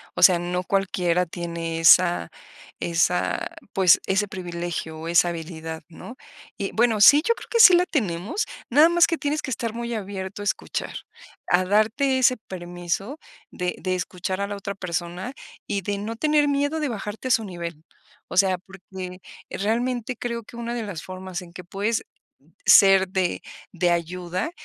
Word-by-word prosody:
O - - -3
sea, 180 -2 +8
no 180 +1 -2
cualquiera 180 -2 0
tiene 170 -1 -4
esa 175 - +5 0.5
esa 175 +1 0 0.3
pues, 185 -3 +5
ese 205 +2 +1
privilegio, 175 -3 -5
o 160 - -6
esa 170 +1 +4
habilidad, 160 -1 -6
¿no? 225 +8 -11 0.4
Y 195 - -3
bueno, 225 -2 +2
sí, 285 +8 +8
yo 465 - +4
creo - - -12
que 465 - +1
sí 415 -5 +10
la 355 +1 +4
tenemos, 215 - -1 0.2
nada 295 +6 +6
más 345 0 +5
que 330 - -1
tienes 300 +1 -1
que 290 - -6
estar 230 -2 -3
muy 235 0 -4
abierto 195 -1 -6
a - - -7
escuchar, - - -3 0.6
a 180 +1 +4
darte 220 +7 +2
ese 255 0 +4
permiso 175 - -4 0.3
de 180 0 -3
de 185 -1 -1
escuchar 185 +1 -4
a 200 - -1
la 205 - -5
otra 200 0 -6
persona, 180 +4 -4 0.3
y 200 -1 -2
de 205 +2 -3
no 215 +3 -5
tener 300 +3 +2
miedo 285 +2 0
de 300 -2 -1
bajarte 215 +2 -5
a - - +1
su 225 - +3
nivel. 170 -5 -7 0.5
O - - -6
sea, 190 -1 +4
porque 185 0 -10 0.3
realmente 240 +3 -2
creo 235 -1 -4
que 235 - -13
una 235 0 -4
de 235 - -3
las 195 -7 -6
formas 185 +3 -7
en 170 -1 -13
que 180 - -9
puedes 205 +6 -2 0.6
ser 195 -1 +7
de 185 -1 -1 0.3
de 180 -1 +1
ayuda 175 - -2
190 Hz, 175 wpm, -24 LUFS, 175-230 Hz, 0.6 s, sí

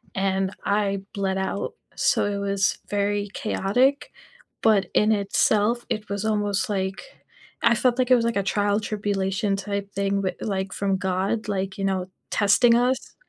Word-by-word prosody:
and 190 0 0
I 200 -1 +1
bled 190 -1 -1
out. 190 +1 -2 0.2
So, - - +2
it 205 -1 -1
was 200 -1 0
very 205 0 0
chaotic, 255 +8 +1 0.5
but 205 -4 +3
in 215 +1 +3
itself, 210 +3 +2
it 215 -1 -3
was 200 +1 -3
almost 205 -2 0
like 190 -1 -2 0.6
I 230 - +5
felt 245 +1 +2
like 255 0 +1
it - - +9
was, 235 -1 +1
like, 235 -2 0
a 200 - +1
trial 205 +1 +1
tribulation 200 -1 -1
type 200 0 -4
thing, 200 0 0
but, 185 -2 -2
like, 195 -2 -2
from 195 -1 0
God, 190 +3 -1
like, 195 -2 -2
you 195 - -2
know, 185 -1 -1 0.2
testing 230 +3 +4
us, 250 +2 0
200 Hz, 165 wpm, -24 LUFS, 195-215 Hz, 0.6 s, it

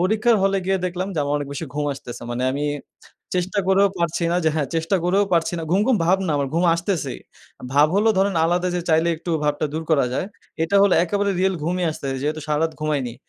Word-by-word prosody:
পরীক্ষার 220 +5 +3
হলে 195 0 +2
গিয়ে 190 0 +1
দেখলাম 180 +2 -3
যে - - -3
আমার 145 +1 -1
অনেক 145 -1 -5
বেশি 160 - -4
ঘুম 150 0 -1
আসতেসে। 125 -4 -9
মানে 120 +1 -2
আমি 145 +2 -2 0.7
চেষ্টা 180 +3 -1
করেও 195 +1 +5
পারছি 170 0 -1
না - - +2
যে 160 - +4
হ্যাঁ 145 -4 -1
চেষ্টা 165 +4 +1
করেও 195 +3 +3
পারছি 165 +1 +1
না। 165 - -4
ঘুম, 190 - +3
ঘুম 255 -4 +3
ভাব 190 +2 +4
না - - -1
আমার 140 -1 -1
ঘুম 170 - +2
আসতেসেই। 170 - -3 0.5
ভাব 145 +1 +6
হলো 215 +2 +3
ধরেন 195 -1 +2
আলাদা 175 +2 +1
যে - - -1
চাইলে 160 +2 +3
একটু 170 +2 -6
ভাবটা 150 +1 0
দূর 160 - -2
করা 140 -5 +3
যায়। 185 - -1 0.4
এটা 200 +5 +1
হলো 200 - +4
একেবারে 200 +3 0
রিয়াল 190 0 +2
ঘুমই 180 +2 0
আসতেসে। 135 -3 -4
যেহেতু 155 +2 -2
সারারাত 160 +2 +1
ঘুমাইনি। 145 -6 -1
170 Hz, 220 wpm, -22 LUFS, 150-190 Hz, 0.7 s, ভাব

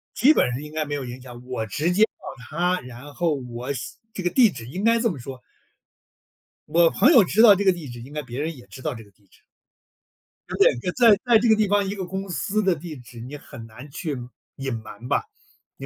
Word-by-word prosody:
基 280 +5 +6
本 - - +3
上 125 - -4
应 150 0 -9
该 155 -1 -2
没 145 - -5
有 140 - -4
影 120 +1 -7
响， 120 -1 -11
我 125 -3 -3
直 155 - -1
接 210 +4 +4
告 - - -1 0.3
他， 180 +3 0
然 125 +4 -11
后 170 -3 0 0.2
我 125 +4 -4
写 125 - -7 0.2
这 190 - -5
个 175 - +1
地 240 -1 +5
址 115 -10 -9
应 180 +10 -5
该 230 +1 +4
这 230 -1 +2
么 165 - -5
说 130 +1 -9 1.3
我 170 0 +5
朋 270 - +4
友 240 -10 +8
知 210 +5 +3
道 220 -4 +9
这 200 +1 -2
个 190 - +5
地 160 -6 -8
址， 120 0 -8
应 135 +5 -11
该 150 - -3
别 125 -1 -7
人 155 +2 -3
也 125 - -14
知 130 +7 -11
道 150 -3 -3
这 110 - -10
个 100 - -21
地 100 0 -32
址。 - - -26 1.1
呃， - - -4
对， - - +5 0.2
在 230 -2 +6
在 235 -3 +6
这 235 - +1
个 220 - +6
地 215 -1 +2
方， 205 0 +2
一 200 - -3
个 190 -2 -4
公 190 +2 -5
司 205 +4 -1
的 190 -4 +2
地 160 -1 -8
址 125 -1 -13
你 135 +5 -7
很 115 -5 -11
难 120 +6 -12
去 145 -1 -4 0.4
隐 135 -2 -4
瞒 110 +1 -8
吧， - - +1 0.5
你 - - -8
150 Hz, 265 characters per minute, -24 LUFS, 125-195 Hz, 1.3 s, 道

